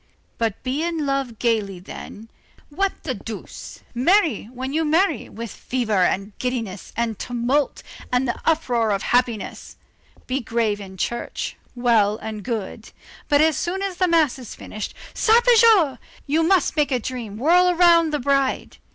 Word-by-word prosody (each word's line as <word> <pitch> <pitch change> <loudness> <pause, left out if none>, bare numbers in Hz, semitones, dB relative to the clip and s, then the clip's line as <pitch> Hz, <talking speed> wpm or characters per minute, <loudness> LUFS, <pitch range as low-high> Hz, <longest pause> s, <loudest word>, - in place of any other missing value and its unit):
But 225 -3 -1
be 265 +4 -1
in 330 -2 -1
love 275 -4 -2
gayly 215 -5 0
then, 205 +4 -10 0.4
what 390 +6 0
the 265 - -2
deuce! 220 -1 -9
marry, 315 - +2
when 255 +4 -6
you 320 +1 +1
marry, 320 - +1
with 230 0 -7
fever 220 -7 0
and 195 +3 -1
giddiness, 230 -7 -4
and 230 -2 -1
tumult, 245 +4 -1 0.3
and 250 +1 +1
the 240 - -3
uproar 245 -8 +1
of 200 -1 0
happiness! 240 -4 -1 0.5
Be 260 +2 -1
grave 225 -4 -1
in 190 -1 -10
church, 235 +6 -3 0.2
well 225 -4 +3
and 220 -2 -6
good. 220 -2 -5 0.4
But, 290 0 +5
as 315 -1 +4
soon 380 +3 -2
as 385 -3 -3
the 365 - +2
mass 320 -6 +2
is 245 - -9
finished, 215 - -7 0.2
sarpejou! 450 - +5 0.3
you 300 +3 +1
must 355 0 +2
make 295 -2 +1
a 255 - +3
dream 230 -4 -6
whirl 350 +8 +4
around 340 -2 +5
the 300 - 0
bride. 275 0 0
255 Hz, 155 wpm, -22 LUFS, 225-320 Hz, 0.5 s, But